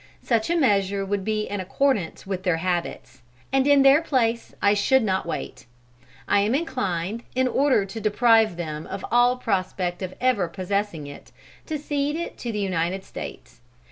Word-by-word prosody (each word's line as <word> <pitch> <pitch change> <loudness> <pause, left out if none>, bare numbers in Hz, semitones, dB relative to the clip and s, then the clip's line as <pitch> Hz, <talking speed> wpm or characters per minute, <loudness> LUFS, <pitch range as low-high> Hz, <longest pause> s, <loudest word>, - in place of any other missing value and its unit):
Such 230 0 +1
a 345 - +2
measure 200 - +2
would 200 0 -2
be 215 +1 -1
in 205 - -4
accordance 200 -1 -1
with 190 -1 -3
their 180 -3 +1
habits; 170 -7 -3 0.3
and 270 0 +3
in 285 -1 +6
their 275 +3 +6
place 235 -7 0
I 200 - +4
should 240 +5 +3
not 190 -4 -1
wait. 130 -6 -6 0.6
I 205 - +3
am 210 +5 +2
inclined, 220 - -2
in 260 0 +2
order 260 -4 +2
to 195 +3 -7
deprive 220 -2 +3
them 155 -2 -5
of 195 0 -6
all 245 +1 +4
prospect 185 -5 -2
of 185 -1 -5
ever 245 -8 +2
possessing 190 -3 -3
it, 145 0 -11 0.4
to 315 - -2
cede 290 0 -2
it 340 +1 -4
to 240 - -4
the 210 - -4
United 190 -1 -1
States. - - -9
205 Hz, 170 wpm, -24 LUFS, 185-255 Hz, 0.6 s, in